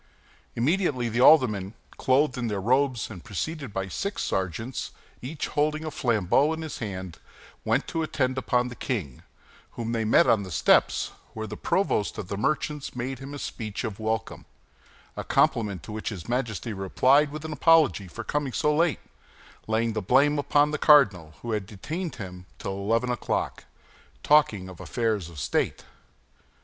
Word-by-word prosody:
Immediately 135 -2 +1
the 120 +2 0
aldermen, 110 -9 +5 0.2
clothed 135 +1 +2
in 125 -2 -2
their 105 -2 -2
cloth 95 - -6
robes 130 -3 +2
and 90 -5 -9
preceded 135 - -4
by 95 -1 -3
six 200 - -3
sergeants, 95 +7 -3 0.3
each 145 +5 -4
holding 155 +1 0
a 155 - -4
flambeau 125 - +2
in 160 0 -5
his 155 - -6
hand, 95 -6 -6 0.4
went - - +1
to 165 - -2
attend 130 -5 0
upon 125 -1 +1
the 125 - -9
king, 90 - -4 0.5
whom 115 -1 -4
they 115 -1 0
met 110 - +5
on 110 - +3
the 95 - -7
steps, 85 - +3 0.2
where 110 0 -4
the 105 0 -6
provost 110 - 0
of 90 - -6
the - - -2
merchants 150 +4 -2
made 125 +1 -4
him 135 +1 -8
the - - -5
speech 110 -6 -5
of 110 -3 -5
welcome—a 110 0 -7
compliment 100 -7 +1
to - - -8
which 110 0 -4
his 95 -7 -7
Majesty 120 -2 -2
replied 130 +9 +3
with 155 +1 -7
an 155 - -4
apology 150 - +4
for 115 +7 -7
coming 145 0 -2
so 150 0 +1
late, 165 -1 +1 0.7
laying 110 +1 +1
the 110 - -2
blame 140 +8 +3
upon 145 +1 +3
the 150 - -2
cardinal, 100 - +5
who 120 - -3
had 105 -3 -2
detained 160 - -5
him 90 -2 -9
till - - -4
eleven 115 +5 0
o'clock, 120 - -2 0.6
talking 115 -11 +3
of 95 -2 -11
affairs 110 -7 -1
of 85 - -13
state. - - -1
120 Hz, 170 wpm, -26 LUFS, 100-145 Hz, 0.7 s, aldermen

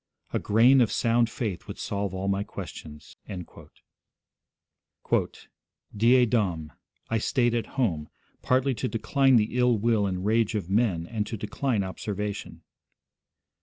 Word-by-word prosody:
A - - +1
grain 120 +5 +5
of 115 - +2
sound 115 0 +2
faith 105 -7 -4
would - - -7
solve 100 -1 -3
all 95 +1 -4
my 100 0 +1
questions.' 75 -5 -9 2.8
'Die 120 +4 +5
Dom. 90 -10 -1 0.4
I 115 - +2
stayed 120 +1 +1
at 120 -1 0
home, 80 - 0 0.3
partly 130 +1 +2
to 130 +2 -2
decline 135 +3 +2
the 115 +2 +2
ill 125 -2 +4
will 110 -1 +2
and 90 0 -3
rage 110 0 +2
of 95 -3 -3
men 100 -6 +1
and 105 +2 -3
to 115 - -4
decline 110 +2 -1
observation.' 100 +2 -5
110 Hz, 130 wpm, -27 LUFS, 100-120 Hz, 2.8 s, grain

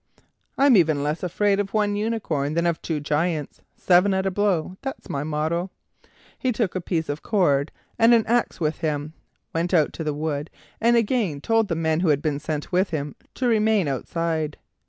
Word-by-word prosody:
"I'm 275 -2 +5
even 155 -5 +3
less 150 +2 -2
afraid 200 +3 +1
of 200 +1 -2
one 205 -1 +2
unicorn 200 -10 -1
than 170 0 +1
of 170 -2 0
two 160 -3 -2
Giants; 150 +1 -2 0.2
seven 185 +2 +4
at 190 0 0
a 195 - +1
blow, 185 -3 0
that's 270 +2 -6
my 140 0 -2
motto." 155 +4 -1 0.7
He 255 - +1
took 220 -5 -1
a 185 - -2
piece 165 -2 -2
of 145 +1 -4
cord 150 -9 +1 0.3
and 225 +1 +6
an 230 -2 +5
axe 240 +1 0
with 155 -2 -1
him, 150 -1 -2 0.4
went 170 +3 0
out 155 -3 +3
to 160 - -5
the 150 -2 -2
wood, 150 0 -3 0.3
and 235 +1 +4
again 220 - 0
told 225 +6 +1
the 165 - -1
men 160 -1 0
who 180 - +1
had 145 -1 +2
been 150 -3 -1
sent 150 +1 -4
with 185 +2 +2
him 145 -3 -4 0.2
to 255 - 0
remain 215 -5 +3
outside. 155 +2 -2
170 Hz, 195 wpm, -24 LUFS, 150-205 Hz, 0.7 s, and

